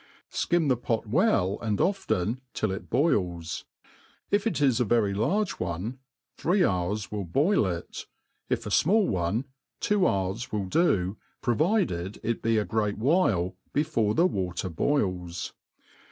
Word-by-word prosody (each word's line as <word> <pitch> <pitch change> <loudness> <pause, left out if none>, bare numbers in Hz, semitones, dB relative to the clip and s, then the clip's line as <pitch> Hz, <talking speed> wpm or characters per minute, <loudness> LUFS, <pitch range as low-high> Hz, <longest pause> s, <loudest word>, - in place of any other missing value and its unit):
Skim 175 -3 +1
the 130 - +4
pot 115 -1 -1
well 105 - +2
and 105 -3 -1
often, 120 - 0
till 110 - 0
it 95 - -6
boils. 90 - 0 0.7
If 205 +2 +2
it 175 - -1
is 135 -4 +3
a - - +4
very 110 -3 +2
large 175 - 0
one, 90 +9 -3 0.4
three 180 +2 +3
hours 100 +3 -1
w'Al 105 -2 -3
boil 140 - +2
it; 85 -2 -5 0.4
if 120 -2 -1
a - - -3
fmall 200 - +4
one, 95 +7 0 0.3
two 205 -3 +2
hours 95 +3 -1
will 105 -2 -1
do, 95 - +1 0.3
provided 120 - +1
it 115 0 -1
be 115 0 +2
a 105 - +1
great 105 -2 -1
while 110 - +2 0.2
brfore 130 -8 +1
the 170 - +4
water 95 - -1
boils. 90 - -1
110 Hz, 145 wpm, -27 LUFS, 95-150 Hz, 0.7 s, the